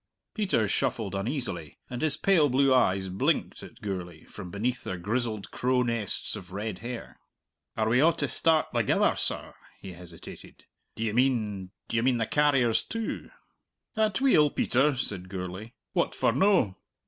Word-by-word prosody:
Peter 190 - +1
shuffled 110 -3 -1
uneasily, 100 - -3
and 125 -1 -5
his 155 -3 +2
pale 170 -7 +4
blue 135 +1 +4
eyes 95 -6 +3
blinked 95 +1 0
at - - -12
Gourlay 90 -5 -5
from 95 -4 -9
beneath 115 +6 -2
their 95 - -4
grizzled 110 +2 -2
crow 125 0 +1
nests 115 -4 -2
of 90 0 -10
red 100 0 -4
hair. 120 +1 -7 0.6
"Are 110 -1 +1
we 120 +4 +4
a' 165 +3 +6
to - - -2
start 160 -1 +2
thegither, - - +2
sir?" - - 0 0.3
he 95 - -8
hesitated. 85 -1 -12 0.3
"D'ye 110 -1 -1
mean 110 -7 +1 0.2
d'ye 115 - 0
mean 125 0 +2
the 115 - 0
carriers 135 -5 +3
too?" 225 -1 -4 0.7
"Atweel, 215 - +4
Peter!" 135 +2 +2
said 95 -7 -3
Gourlay. 95 +4 -6 0.2
"What - - 0
for - - +2
no?" 135 - +3
115 Hz, 150 wpm, -28 LUFS, 95-135 Hz, 0.7 s, a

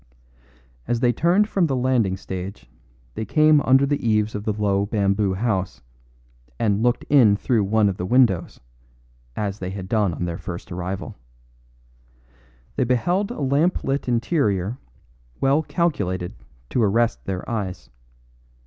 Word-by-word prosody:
As 120 - 0
they 120 0 +2
turned 180 - +3
from 190 -5 +1
the 135 - -1
landing 125 -7 +1
stage 95 +1 -7 0.5
they - - -4
came 155 +6 +4
under 135 +1 +4
the 145 0 -1
eaves 110 -1 +1
of 105 0 -5
the 110 - +1
low 100 -1 0
bamboo 100 -2 +1
house, 95 - -2 0.7
and 105 -1 +1
looked 120 +1 +1
in 120 -8 +5
through 105 0 +1
one 105 +1 +3
of 95 -2 -2
the 90 - -3
windows, 110 -8 +2 0.8
as 100 -1 -3
they 90 - -4
had 95 -1 -6
done 105 -3 +1
on 90 - -3
their 85 0 -4
first 85 +1 -7
arrival. 90 -1 -5 1.6
They - - +2
beheld 175 - +1
a 240 - -6
lamp 145 +6 +1
lit 135 0 -2
interior 120 - 0 0.6
well 140 +3 +3
calculated 100 - -1 0.4
to 125 - +1
arrest 115 +2 +1
their 95 -1 -4
eyes. 95 - -4
110 Hz, 145 wpm, -22 LUFS, 95-130 Hz, 1.6 s, in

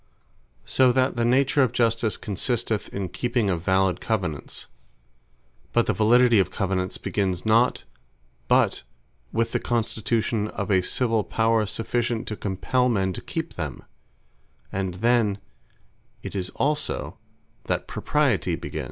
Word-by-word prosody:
So 130 -1 +4
that 130 0 +2
the 120 - 0
nature 135 +4 +3
of 125 -3 +2
Justice, 115 -2 +1
consisteth 110 +1 -2
in 100 -2 -3
keeping 120 0 0
of 85 -2 -1
valid 95 +1 +1
Covenants: 90 -10 -2 1.1
but 120 - +3
the - - +1
Validity 120 +1 +5
of 95 - +2
Covenants 95 -1 -2
begins 95 -3 -2
not 115 +3 +3 0.6
but - - +3 0.5
with 115 0 0
the - - 0
Constitution 110 -1 -1
of 100 -1 -4
a 95 -1 +4
Civill 115 +2 0
Power, 110 0 +1
sufficient 120 +2 -2
to 105 - -3
compell 125 +6 0
men 95 -4 0
to - - -6
keep - - -4
them: - - -5 0.9
And 95 -2 -2
then 115 -1 +2 0.9
it - - -6
is 95 -2 -3
also 150 +1 -2 0.5
that - - -1
Propriety - - +1
begins. - - -6
110 Hz, 135 wpm, -25 LUFS, 95-120 Hz, 1.1 s, Validity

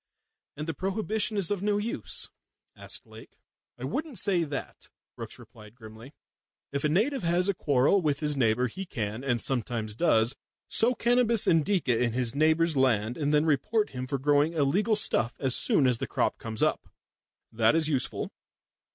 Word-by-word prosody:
"And 150 - -4
the 165 - -3
prohibition 210 +3 -2
is 200 -1 +1
of 200 -3 -1
no 205 0 +1
use?" 215 +3 -3 0.4
asked - - -7
Lake. - - -15 0.4
"I - - -10
wouldn't 305 -6 -4
say 185 -5 +1
that," 145 -3 -7 0.3
Brookes - - -6
replied 105 0 -15
grimly. 115 +4 -13 0.6
"If 140 0 -3
a 150 - +2
native 230 - +1
has 175 +2 +1
a 200 - +2
quarrel 145 +4 +2
with 145 -4 0
his 150 -1 0
neighbour, 125 -1 +2
he 160 +11 -5
can 110 - -5
and 125 -3 0
sometimes 115 -3 -3
does 115 -2 +2 0.3
sow 245 +3 +3
cannabis 235 -1 +2
Indica 160 - +2
on 120 -2 -1
his 125 -1 0
neighbour's 160 +2 +2
land 120 -4 +1
and 145 -2 -1
then 150 +1 +3
report 210 +8 0
him 130 0 -5
for 140 - -2
growing 145 +3 +2
illegal 180 +9 +1
stuff 120 - +1
as 130 -3 +2
soon 140 - +5
as 125 -2 +2
the - - -3
crop - - -1
comes 110 -1 -3
up. - - 0 0.6
That 110 +4 +2
is 160 -2 +2
useful. 140 -5 -2
150 Hz, 175 wpm, -27 LUFS, 125-195 Hz, 0.6 s, soon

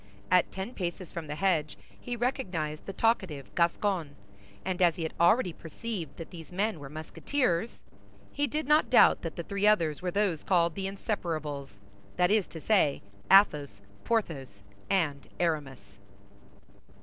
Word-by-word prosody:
At 180 -1 +4
ten 190 +6 -5
paces 175 -3 -4
from 165 -2 -6
the 150 - -4
hedge 160 -4 0 0.2
he 245 - -4
recognized 190 - -2
the - - -3
talkative 190 - 0
Gascon; 170 -3 0 0.5
and 185 -1 -2
as 170 -3 +5
he 170 - -4
had 160 - -3
already 175 +2 +4
perceived 175 +1 -6
that 165 - -8
these 165 -4 -10
men 200 0 -1
were 140 -1 -8
Musketeers, 170 - -1 0.5
he 290 0 0
did 305 -1 -3
not 300 +1 +4
doubt - - +6
that - - -5
the - - -4
three 200 0 0
others 165 -8 +3
were 180 - -1
those 190 -4 0
called 170 -3 +2
the 190 +1 -3
Inseparables; 155 - -4 0.4
that 180 +1 +3
is 210 -3 +3
to 165 - -9
say, 155 - +2 0.3
Athos, 145 - +5 0.2
Porthos, 140 - -2 0.3
and 150 -7 0
Aramis. 135 - -2
175 Hz, 150 wpm, -29 LUFS, 155-200 Hz, 0.5 s, doubt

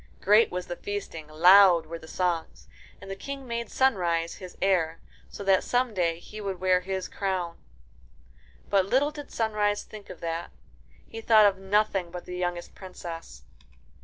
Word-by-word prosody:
Great 210 +3 +5
was 180 0 -4
the 175 - -5
feasting, 190 -7 -6
loud 175 +2 +6
were 165 +1 -7
the 160 - -13
songs, 175 -2 -2 0.3
and 195 - -9
the - - -4
King 275 +6 -7
made 235 0 -4
Sunrise 175 -10 +1
his 185 -2 -11
heir, 170 -4 +1 0.3
so - - -8
that 195 -1 +3
some 245 -1 0
day 170 -4 0
he 210 +5 -10
would 195 -3 -4
wear 185 -1 +3
his 190 0 -4
crown. 185 -4 -3 1.1
But 190 -1 +2
little 275 +7 +2
did 295 -1 -9
Sunrise 210 -2 0
think 210 -2 -12
of - - -9
that. 165 0 -3 0.6
He 225 - -8
thought 220 -1 +6
of 195 -2 +2
nothing 195 -2 +1
but 180 0 -8
the 180 - -7
youngest 175 -1 -3
Princess. 165 - -9
190 Hz, 165 wpm, -27 LUFS, 175-210 Hz, 1.1 s, loud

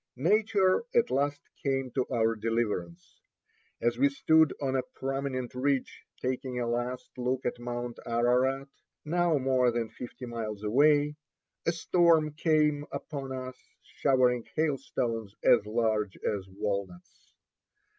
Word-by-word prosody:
Nature 195 - +3
at 470 - +3
last 145 +1 -1
came 135 -2 -1
to 130 0 -1
our 115 0 +2
deliverance. 105 -6 -3 0.6
As 120 +1 0
we 140 +1 +5
stood 160 +2 +4
on 135 -2 -1
a 130 - +2
prominent 135 -2 -3
ridge 135 +1 -1
taking 130 0 -2
a 120 - -1
last 120 +1 -3
look 125 +1 -1
at 120 - -2
Mount 120 0 -5
Ararat, 125 +4 +2 0.4
now 170 0 +2
more 130 -2 +3
than 115 -1 -2
fifty 125 +1 -8
miles 110 -3 -5
away, 145 +6 +3 0.5
a - - +5
storm 165 -2 +3
came 150 -1 +2
upon 140 -3 -5
us, 130 -1 -6 0.2
showering 125 -3 +2
hailstones 120 -8 -1
as 110 -4 +5
large 110 -3 0
as 100 -3 -3
walnuts. 100 -2 -5
130 Hz, 125 wpm, -29 LUFS, 115-145 Hz, 0.6 s, we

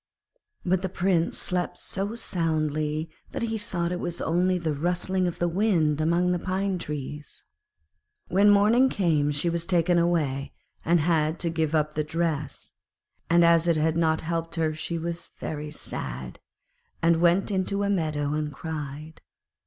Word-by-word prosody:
But 185 0 +2
the 190 - -2
Prince 175 -2 +1
slept 180 -1 -2
so 200 +3 -3
soundly 155 -6 -1 0.3
that - - -3
he 225 -1 -1
thought 175 -5 -2
it 180 - -2
was 175 -1 -2
only 180 +2 +1
the 165 -3 -1
rustling 180 +4 0
of 175 - -3
the 175 - +1
wind 170 -5 +2
among 170 +3 +2
the 180 - 0
pine 190 +1 -1
trees. 150 -1 -6 0.8
When 200 +4 +4
morning 215 +6 +5
came 160 - +1
she 145 +4 -1
was 170 0 -1
taken 175 -1 +3
away, 150 -6 0 0.3
and 170 0 +3
had 160 0 +1
to 170 -2 0
give 160 -1 0
up 150 0 +1
the 155 - 0
dress; 155 -2 -3 0.6
and 170 0 +5
as 170 0 +4
it 165 -2 +3
had 160 +1 +1
not 160 -1 +2
helped 165 0 -3
her 160 -2 0
she 170 +2 -4
was 170 +1 -5
very 150 -1 -5
sad, 65 - -6 0.6
and 165 0 +4
went 175 +4 +3
out 195 - 0
into 200 +2 0
a 200 - 0
meadow 155 -5 0
and 150 -1 -2
cried. 150 0 -7
170 Hz, 165 wpm, -26 LUFS, 155-180 Hz, 0.8 s, morning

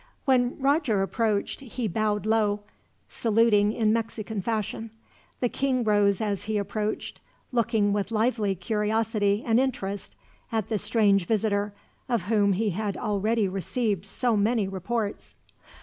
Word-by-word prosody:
When 250 -2 +2
Roger 275 -7 +2
approached, 210 0 -1
he 250 -3 -4
bowed 210 +1 0
low, 215 -2 +2 0.5
saluting 215 -2 +3
in 220 -1 +2
Mexican 225 -2 -3
fashion. 225 +1 -3 0.5
The 245 - +3
king 255 0 0
rose 205 -2 +3
as 205 -3 -2
he 215 0 -1
approached, 210 +1 -3 0.3
looking 225 -4 +2
with 205 -1 -1
lively 220 -3 +1
curiosity 210 +2 0
and 230 0 +3
interest 205 -7 -2 0.4
at 220 -3 -1
the 215 -2 0
strange 205 -4 +2
visitor, 205 -2 0 0.4
of 235 -6 +1
whom 205 0 +2
he 210 +2 0
had 205 +2 -3
already 215 +1 0
received 195 +1 -2
so 240 +3 +1
many 210 0 +2
reports. 205 +3 -3
215 Hz, 135 wpm, -26 LUFS, 205-230 Hz, 0.5 s, saluting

